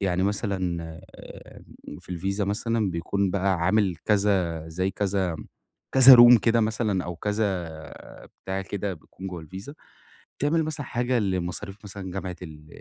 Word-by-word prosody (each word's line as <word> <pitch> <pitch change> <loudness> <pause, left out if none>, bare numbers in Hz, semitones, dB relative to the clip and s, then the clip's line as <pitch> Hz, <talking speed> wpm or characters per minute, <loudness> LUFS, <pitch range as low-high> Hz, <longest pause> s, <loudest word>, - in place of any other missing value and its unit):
يعني 95 -2 0
مثلًا 95 -4 -1 0.4
آآ، - - -13 0.4
في 90 - -9
الVisa 100 +3 -2
مثلًا 110 0 -1
بيكون 95 +3 -1
بَقى 95 0 +1
عامل 95 0 +1
كذا 95 -6 +1
زي 95 +4 -2
كذا 95 -5 -1 0.6
كذا 130 -1 +10
room 120 0 +9
كده 115 0 +2
مثلًا 110 -4 0
أو 90 -1 -6
كذا 100 -3 -2 0.7
بتاع 95 0 -3
كده 100 0 -4
بيكون 95 +4 -11
جوا 90 -3 -7
الVisa 95 - -9 0.7
بتعمل 160 +3 +1
مثلًا 150 -4 -5
حاجة 120 +1 0
لمصاريف 95 0 -3
مثلًا 95 -2 -7
جامعة 95 -1 -5
ال 75 -2 -11
95 Hz, 140 wpm, -25 LUFS, 90-105 Hz, 0.7 s, كذا